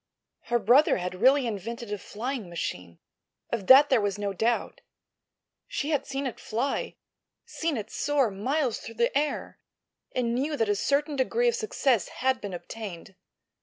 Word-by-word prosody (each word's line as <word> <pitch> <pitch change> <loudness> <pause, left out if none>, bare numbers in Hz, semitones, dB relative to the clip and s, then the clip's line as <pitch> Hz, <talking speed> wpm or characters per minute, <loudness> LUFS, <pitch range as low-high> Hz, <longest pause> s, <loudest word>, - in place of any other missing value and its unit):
Her 240 - +2
brother 240 +7 +5
had 180 +1 -5
really 265 +2 +5
invented 230 +1 -4
a - - -2
flying 230 0 -5
machine, 90 - -5 0.5
of 220 -5 -3
that 275 +2 +8
there 250 -4 +5
was 205 -1 -1
no 200 -1 -2
doubt. 230 +5 -1 0.9
She 300 +2 -2
had 280 -3 0
seen 275 0 -3
it 255 - -4
fly—seen 275 +5 -4
it 215 - -6
soar 280 -6 +1
miles 255 +5 -1
through 230 - -9
the 235 +3 +1
air—and 255 -4 -4
knew 290 +5 -1
that 225 -4 +1
a 205 - +3
certain 285 +7 0
degree 445 - +1
of - - 0
success 280 - +1
had 260 0 -1
been 200 -3 -5
obtained. 190 -1 -8
240 Hz, 155 wpm, -27 LUFS, 205-280 Hz, 0.9 s, that